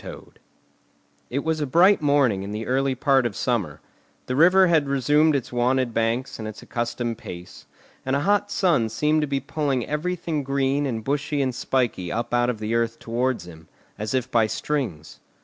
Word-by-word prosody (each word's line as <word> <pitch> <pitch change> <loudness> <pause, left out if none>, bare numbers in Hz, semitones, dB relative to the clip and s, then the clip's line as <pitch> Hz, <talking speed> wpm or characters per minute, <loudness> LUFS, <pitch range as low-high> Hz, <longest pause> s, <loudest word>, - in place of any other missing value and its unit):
TOAD - - -11 0.9
It 140 +3 -2
was 160 -1 -1
a 145 - -1
bright 180 +8 +5
morning 140 -9 +2
in 100 +1 -6
the 110 +1 -4
early 135 +2 0
part 135 -1 +2
of 105 - -8
summer; 105 - -2 0.4
the 125 - -3
river 180 +6 +6
had 160 -5 +2
resumed 145 +3 +3
its 130 -2 -3
wonted 125 0 +1
banks 115 +4 -1
and 110 - -5
its 110 - -9
accustomed 120 -1 -3
pace, 85 -5 -10 0.4
and 130 +1 0
a 140 - 0
hot 205 +4 +1
sun 160 - +2
seemed 150 +6 +1
to 150 - -1
be 140 -1 -1
pulling 140 -3 -2
everything 160 0 -2
green 140 +1 0
and 115 -4 -3
bushy 145 +3 -1
and 130 -2 0
spiky 120 -9 -1
up 115 +5 -3
out 120 0 +2
of 120 - -2
the 110 +1 -3
earth 115 0 0
towards 120 -3 -2
him, 80 -2 -13 0.3
as 105 +3 -2
if 130 0 -2
by 115 -2 +3
strings. 110 - -4
130 Hz, 185 wpm, -24 LUFS, 115-145 Hz, 0.9 s, river